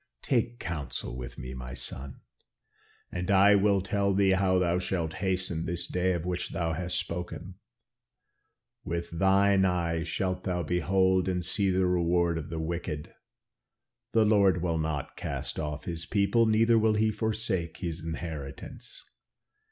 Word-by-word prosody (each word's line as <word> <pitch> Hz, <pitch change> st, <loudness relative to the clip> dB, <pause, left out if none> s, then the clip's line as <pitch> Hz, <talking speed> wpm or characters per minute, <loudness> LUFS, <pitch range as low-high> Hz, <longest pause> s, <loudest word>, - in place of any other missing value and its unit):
Take 120 Hz, -2 st, 0 dB
counsel 75 Hz, -8 st, -4 dB
with 60 Hz, -1 st, -7 dB
me, 65 Hz, +1 st, -6 dB
my 65 Hz, -1 st, -7 dB
son, 65 Hz, 0 st, -5 dB, 0.9 s
and 90 Hz, +1 st, -4 dB
I 100 Hz, +1 st, +6 dB
will 100 Hz, -1 st, +3 dB
tell 100 Hz, +1 st, 0 dB
thee 100 Hz, -1 st, +4 dB
how 95 Hz, -1 st, +3 dB
thou 90 Hz, -1 st, +2 dB
shalt 85 Hz, -3 st, -2 dB
hasten 90 Hz, -4 st, -1 dB
this 85 Hz, +1 st, -1 dB
day 90 Hz, +1 st, 0 dB
of 85 Hz, -1 st, -3 dB
which 90 Hz, -1 st, -2 dB
thou 85 Hz, -3 st, -1 dB
hast 90 Hz, +2 st, -1 dB
spoken. 90 Hz, 0 st, -5 dB, 1.2 s
'With 85 Hz, 0 st, -4 dB
thine 95 Hz, +3 st, +4 dB
eyes 85 Hz, -3 st, 0 dB
shalt 90 Hz, +1 st, -2 dB
thou 90 Hz, -2 st, -1 dB
behold 95 Hz, +3 st, +2 dB
and 90 Hz, -2 st, -1 dB
see 100 Hz, +1 st, +1 dB
the 95 Hz, 0 st, +2 dB
reward 85 Hz, -1 st, +2 dB
of 80 Hz, 0 st, -8 dB
the 80 Hz, -, -4 dB
wicked. 80 Hz, -2 st, -4 dB, 1.0 s
The 110 Hz, -1 st, +5 dB
Lord 100 Hz, -4 st, +4 dB
will 85 Hz, -2 st, 0 dB
not 80 Hz, -3 st, -3 dB
cast -, -, -4 dB
off 75 Hz, -1 st, -4 dB
his 85 Hz, -1 st, -5 dB
people, 105 Hz, +3 st, +3 dB
neither 115 Hz, +1 st, +4 dB
will 110 Hz, 0 st, +3 dB
he 110 Hz, +1 st, +2 dB
forsake 105 Hz, -6 st, -2 dB
his 85 Hz, -3 st, -4 dB
inheritance. 80 Hz, -4 st, -7 dB
90 Hz, 150 wpm, -29 LUFS, 80-95 Hz, 1.2 s, I